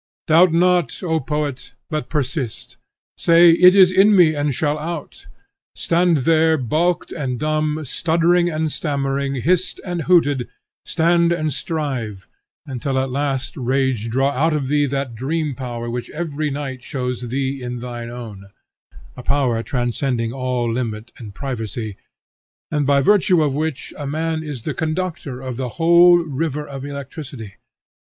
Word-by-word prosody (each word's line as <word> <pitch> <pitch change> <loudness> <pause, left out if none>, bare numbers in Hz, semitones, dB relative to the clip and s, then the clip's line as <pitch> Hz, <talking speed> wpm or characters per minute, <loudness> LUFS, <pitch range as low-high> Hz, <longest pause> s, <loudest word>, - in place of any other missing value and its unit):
Doubt 165 +3 +5
not, 180 +2 +2
O 160 -2 +1
poet, 145 -1 -4 0.2
but 155 -1 -3
persist. 135 -5 -3 0.4
Say 170 0 +6
'It 180 +3 +7
is 185 -2 +7
in 195 +3 +5
me, 170 -4 +6
and 145 -1 0
shall 145 +3 0
out.' 165 0 -6 0.5
Stand 170 -1 +2
there, 160 0 +4
balked 160 +7 0
and 130 -6 -3
dumb, 155 0 0
stuttering 170 +5 +2
and 155 -1 -1
stammering, 140 -2 -2
hissed 175 +8 0
and 175 -2 -3
hooted, 145 -7 +2 0.4
stand 170 0 +2
and 155 -4 0
strive, 125 - -4 0.4
until 135 0 -3
at 130 0 0
last 135 -1 -2
rage 130 -3 0
draw 135 +4 +1
out 155 +4 +1
of 140 -3 -1
thee 145 0 +2
that 135 -2 -3
dream 145 +5 -2
power 120 -2 -5
which 120 0 -4
every 155 -2 -3
night 135 -3 -5
shows 125 -2 -4
thee 135 +1 -2
is 125 0 -5
thine 120 -1 -6
own; 110 -5 -9 0.7
a 125 - -8
power 130 -4 +1
transcending 120 -1 -2
all 125 -3 -1
limit 115 -2 -4
and 105 -5 -10
privacy, 110 -5 -4 0.8
and 150 -3 0
by 140 -1 +4
virtue 185 0 +4
of 145 -3 0
which 150 -2 -3
a 145 - -4
man 160 +2 -2
is 145 -7 -7
the - - -3
conductor 155 -5 -3
of 130 -2 -5
the 130 -1 -3
whole 170 +1 +6
river 150 -2 -2
of 135 -1 -7
electricity. 140 -6 -7
145 Hz, 150 wpm, -20 LUFS, 125-160 Hz, 0.8 s, It